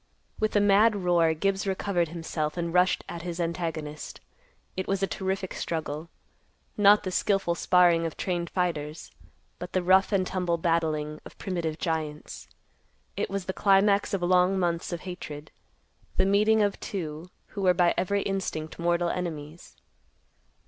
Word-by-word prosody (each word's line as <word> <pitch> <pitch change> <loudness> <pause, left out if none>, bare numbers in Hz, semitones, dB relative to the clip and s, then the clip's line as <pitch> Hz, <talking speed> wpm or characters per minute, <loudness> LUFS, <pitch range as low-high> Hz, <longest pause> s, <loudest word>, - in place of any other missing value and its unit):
With 215 0 0
a - - +6
mad 205 +2 +5
roar, 175 -4 +2
Gibbs 195 +4 -1
recovered 190 -2 0
himself 160 -1 -4
and 170 -1 -2
rushed 180 +1 +3
at 170 - -6
his 175 0 -5
antagonist. 165 -3 -4 0.6
It 185 - -3
was 195 0 0
a - - +5
terrific 190 -1 -3
struggle; 160 0 -4 0.7
not 205 0 +6
the 185 - -3
skillful 195 -2 +1
sparring 170 -1 +3
of 160 - -8
trained 175 -3 -2
fighters, 160 -4 -3 0.5
but - - -7
the 185 - +1
rough 190 +3 +4
and 190 -2 +2
tumble 180 -2 -1
battling 155 -2 0
of - - -13
primitive 170 -5 -3
giants. 155 -3 -4 0.7
It - - -2
was 195 -2 -3
the 190 - -3
climax 200 +1 +3
of 195 -4 -1
long 180 +2 +3
months 170 -2 -1
of 170 -2 -4
hatred; 155 -5 -8 0.7
the 190 - +4
meeting 210 +2 +4
of 205 -1 -1
two 165 -3 -5 0.2
who 200 - -6
were 180 -2 +4
by 175 -1 +3
every 200 +2 0
instinct 180 -6 -3
mortal 170 0 +1
enemies. 165 -2 -6
180 Hz, 155 wpm, -27 LUFS, 165-195 Hz, 0.7 s, a